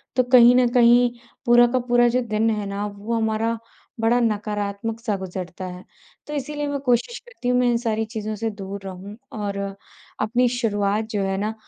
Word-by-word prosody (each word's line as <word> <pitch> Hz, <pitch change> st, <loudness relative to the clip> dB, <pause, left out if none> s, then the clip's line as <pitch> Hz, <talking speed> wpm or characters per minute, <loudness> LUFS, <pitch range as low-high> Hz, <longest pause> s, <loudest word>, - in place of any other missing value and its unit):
तो 255 Hz, -, +4 dB
कहीं 245 Hz, -1 st, +7 dB
न 250 Hz, -1 st, +4 dB
कहीं 245 Hz, 0 st, +5 dB, 0.4 s
पूरा 240 Hz, 0 st, +7 dB
का 255 Hz, -, +2 dB
पूरा 240 Hz, 0 st, +4 dB
जो 250 Hz, +2 st, +1 dB
दिन 220 Hz, +1 st, +1 dB
है 210 Hz, -2 st, -1 dB
ना, 200 Hz, +1 st, -3 dB
वो 205 Hz, +3 st, -6 dB
हमारा 225 Hz, 0 st, 0 dB, 0.4 s
बड़ा 230 Hz, +2 st, +3 dB
नकारात्मक 210 Hz, 0 st, -2 dB
सा 225 Hz, -3 st, -1 dB
गुज़रता 185 Hz, 0 st, -6 dB
है। 180 Hz, 0 st, -8 dB, 0.4 s
तो 300 Hz, -, -6 dB
इसीलिए 295 Hz, +1 st, -3 dB
मैं 285 Hz, -1 st, -2 dB
कोशिश 245 Hz, -, +1 dB
करती 485 Hz, -, -8 dB
हूँ 250 Hz, -, +3 dB
मैं 250 Hz, -, +3 dB
इन 235 Hz, -, +2 dB
सारी 225 Hz, -2 st, -1 dB
चीज़ों 215 Hz, -1 st, -5 dB
से 225 Hz, +2 st, -2 dB
दूर 200 Hz, -1 st, -7 dB
रहूँ 190 Hz, +2 st, -8 dB, 0.2 s
और 200 Hz, -1 st, -3 dB, 0.6 s
अपनी 240 Hz, +4 st, +2 dB
शुरुआत 215 Hz, -3 st, 0 dB
जो 205 Hz, -, -1 dB
है 195 Hz, 0 st, -1 dB
ना 210 Hz, +2 st, -2 dB
225 Hz, 190 wpm, -23 LUFS, 205-245 Hz, 0.6 s, कहीं